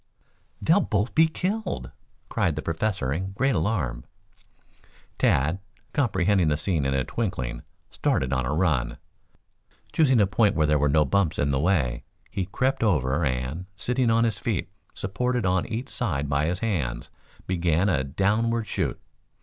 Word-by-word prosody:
"They'll - - +4
both 105 +3 -1
be 160 +1 +5
killed!" 185 +4 -3 0.4
cried 80 - 0
the 75 - -4
Professor 80 -5 -1
in 95 +5 -3
great 135 +6 +1
alarm. 80 - -1 1.2
Tad, 80 +7 +2 0.3
comprehending 95 - +2
the 75 -1 +2
scene 80 -3 0
in 70 0 +1
a 65 - +1
twinkling, 65 - -3 0.3
started 65 0 0
on 65 -1 +1
a 60 - -2
run. 75 -6 +1 1.0
Choosing 135 -7 +4
a 105 - +5
point 105 +1 +2
where 80 - +3
there 75 0 +3
were 75 +1 +2
no 75 +1 +4
bumps 95 0 +1
in 70 0 +1
the 65 - +1
way, 75 -8 +1 0.3
he 95 -2 -2
crept 130 +7 0
over 75 - +2
and, 65 +6 -2
sitting 125 +4 0
on 115 0 +4
his 110 -4 0
feet, 105 -8 -2 0.2
supported 125 +5 -1
on 90 -1 +1
each 115 +4 -4
side 75 - -2
by 70 +2 +1
his 90 +2 -2
hands, 85 - -2 0.3
began 90 0 +1
a 75 -9 +2
downward 110 +10 +1
shoot. - - -2
90 Hz, 160 wpm, -25 LUFS, 70-110 Hz, 1.2 s, be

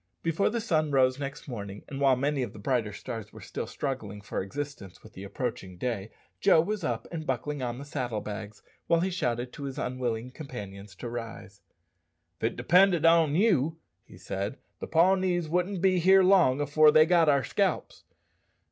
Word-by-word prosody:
Before 165 +4 +1
the 235 +2 -2
sun 155 -8 0
rose 130 -1 +3
next 140 +1 -6
morning, 100 -5 -7
and 140 -1 -6
while 135 -2 +5
many 140 +2 0
of 120 -5 -4
the - - -11
brighter 110 0 -1
stars 110 +1 -7
were - - -12
still - - -6
struggling 110 -8 -4
for 105 - -4
existence 125 -2 -7
with 110 - -15
the 95 - -9
approaching 100 -4 -5
day, 115 -2 -3 0.3
Joe 160 - +5
was 205 +6 -1
up 115 -2 -2
and 160 -3 -5
buckling 135 +3 -2
on 120 -1 -3
the 140 - -8
saddle 125 -6 -3
bags, 105 0 -7 0.2
while 165 0 +3
he 190 +2 0
shouted 125 -7 -2
to 140 - -7
his 135 -1 -6
unwilling 125 -1 -3
companions 100 - -9
to 120 - -7
rise. 115 -3 -7 0.8
"If - - -2
it 115 - -1
depended 175 +5 +4
on 165 -3 +5
you," 165 - +2 0.3
he - - -16
said, 100 +6 -4 0.2
"the - - -6
Pawnees 180 0 +2
wouldn't 180 +3 -1
be 185 -1 +4 0.2
long 180 -8 +4
afore 150 +2 +5
they 155 +1 +6
got 165 -2 +4
our 140 -2 +3
scalps. - - -1
135 Hz, 185 wpm, -28 LUFS, 115-160 Hz, 0.8 s, they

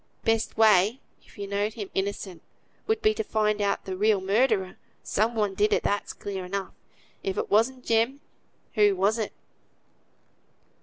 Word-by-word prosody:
"Best 225 -1 0
way, 215 +2 +5 0.2
if - - -20
you 200 - -4
know'd 205 +2 -2
him 205 -4 -6
innocent, 190 -3 -3 0.5
would 440 0 0
be 430 0 +4
to 445 - -2
find 215 - 0
out 200 -1 0
the 190 - -4
real 210 +1 +3
murderer. 195 -1 +1 0.3
Some 220 +3 0
one 210 -3 0
did 210 +2 +2
it, - - +2
that's 205 - -1
clear 195 -2 -6
enough. 195 +2 -4 0.5
If 190 - -3
it - - -2
wasn't 245 +4 +2
Jem, 230 +5 +1 0.5
who 210 -3 +4
was 200 +5 +1
it?" 215 - -2
210 Hz, 160 wpm, -26 LUFS, 195-225 Hz, 0.5 s, way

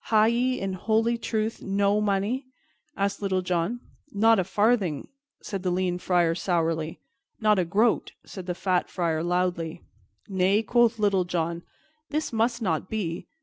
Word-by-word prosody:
"Ha' 215 -1 +4
ye, 245 +3 +1
in 195 -1 -2
holy 225 +5 +1
truth, 220 -1 -2
no 200 +1 +1
money?" 210 +6 0 0.5
asked 200 +1 -1
Little 190 -2 0
John. 180 +7 -1 0.3
"Not 225 +1 +4
a - - +2
farthing," 205 -4 +1 0.4
said 195 -2 -4
the 185 - -1
lean 180 0 0
Friar 175 -2 +2
sourly. 165 -2 -1 0.4
"Not 215 -2 +3
a 180 - +1
groat," 210 +7 +1
said 190 -2 -9
the 180 - -2
fat 185 -1 0
Friar 165 -3 -1
loudly. 175 -1 -1 0.4
"Nay," 195 +2 +2
quoth 235 +1 +3
Little 200 -4 +2
John, 170 -1 -2 0.5
"this 305 -4 -2
must 235 +1 +1
not 170 -1 -1
be. 180 -6 -3
195 Hz, 150 wpm, -26 LUFS, 175-220 Hz, 0.5 s, Ha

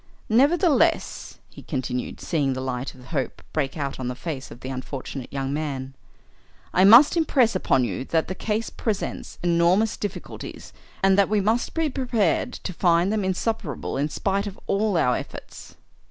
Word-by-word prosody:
Nevertheless," 320 - +2
he - - -12
continued, 130 -3 -3
seeing 145 -5 0
the 130 - -4
light 130 0 -4
of 125 -1 -15
hope 140 -6 -3
break 145 -1 -1
out 140 -3 -3
on 130 - -3
the 125 - -3
face 135 0 -5
of 120 - -12
the 130 - -6
unfortunate 130 0 -6
young 135 0 -2
man, 135 -3 -3 0.8
"I 185 - +4
must 240 - +8
impress 270 - +3
upon 135 -8 +2
you 110 0 -2
that 160 +2 0
the 185 - -3
case 215 +4 -2
presents 215 -4 -3
enormous 175 +5 +3
difficulties 205 -2 -7 0.3
and 195 0 +5
that 200 - +4
we 215 0 +2
must 220 +4 0
be 325 -1 +1
prepared 245 - 0
to 185 - -6
find 175 +3 +3
them 215 -2 0
insuperable 190 -2 -2
in 145 +3 0
spite 200 +5 -1
of 195 - -8
all 205 -2 +1
our 125 -6 +3
efforts." - - -8
175 Hz, 170 wpm, -24 LUFS, 135-220 Hz, 0.8 s, must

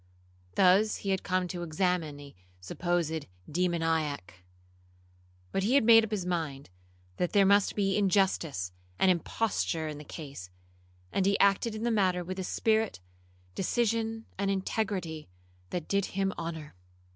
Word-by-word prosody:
Thus 195 +4 +5
he 195 - +1
had 190 - 0
come 185 -1 0
to 175 -1 -4
examine 165 -3 -1
a 140 -1 -11 0.3
supposed 160 - -2 0.2
demoniac; 160 - -1 1.1
but 195 - 0
he 225 +7 +2
had 280 - +5
made 225 0 +8
up 220 - -3
his 205 -4 -2
mind 155 - -3 0.5
that 180 - -1
there 200 -2 +5
must 200 +1 +4
be 195 -2 +1
injustice 185 - +1 0.3
and 190 - +5
imposture 170 -3 -1
in 150 -1 -6
the - - -9
case, 140 - -8 0.6
and 195 -1 +1
he 200 - +3
acted 200 +3 +3
in 215 - -5
the 235 - +1
matter 185 -4 +2
with 185 +2 -5
a - - -2
spirit, 220 - +1 0.5
decision, 225 - 0
and 200 -1 +1
integrity, 190 - -2 0.4
that 175 -3 -4
did 200 -1 +1
him 195 0 -1
honour. 160 -3 -6
185 Hz, 145 wpm, -29 LUFS, 160-200 Hz, 1.1 s, made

